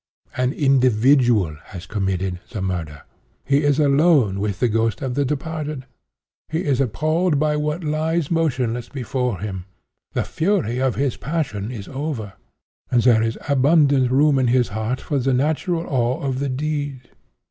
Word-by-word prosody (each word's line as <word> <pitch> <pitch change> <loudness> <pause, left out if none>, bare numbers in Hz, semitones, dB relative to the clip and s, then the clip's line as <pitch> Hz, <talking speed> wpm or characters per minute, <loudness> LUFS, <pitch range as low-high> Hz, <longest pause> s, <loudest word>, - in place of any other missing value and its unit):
An 125 0 +1
individual 125 - +3
has 90 -1 -9
committed 95 -2 -2
the 105 - -5
murder. 85 -6 -4 0.4
He 140 +1 +3
is 145 -2 +2
alone 140 - +3
with 100 -1 -2
the 125 - +3
ghost 115 +3 0
of 130 -2 -2
the 145 +3 +1
departed. 150 0 -4 0.6
He 160 +3 -2
is 140 -3 +1
appalled 155 - +1
by 150 +1 +1
what 150 +3 -2
lies 155 +1 -1
motionless 125 -8 0
before 125 -4 -2
him. 95 -4 -5 0.5
The - - 0
fury 160 - 0
of 130 -2 +1
his 140 -2 -1
passion 130 -9 -3
is 110 -6 -7
over, 135 -8 -4 0.6
and 120 -2 +2
there 120 -3 +5
is 115 0 -1
abundant 140 -1 +3
room 140 +2 +3
in 130 - +2
his 125 0 +2
heart 110 +5 -2
for 145 - -2
the 130 0 +1
natural 160 +5 0
awe 125 +1 0
of 135 -3 -2
the 140 0 -1
deed. 145 -2 -3
130 Hz, 160 wpm, -21 LUFS, 115-150 Hz, 0.6 s, there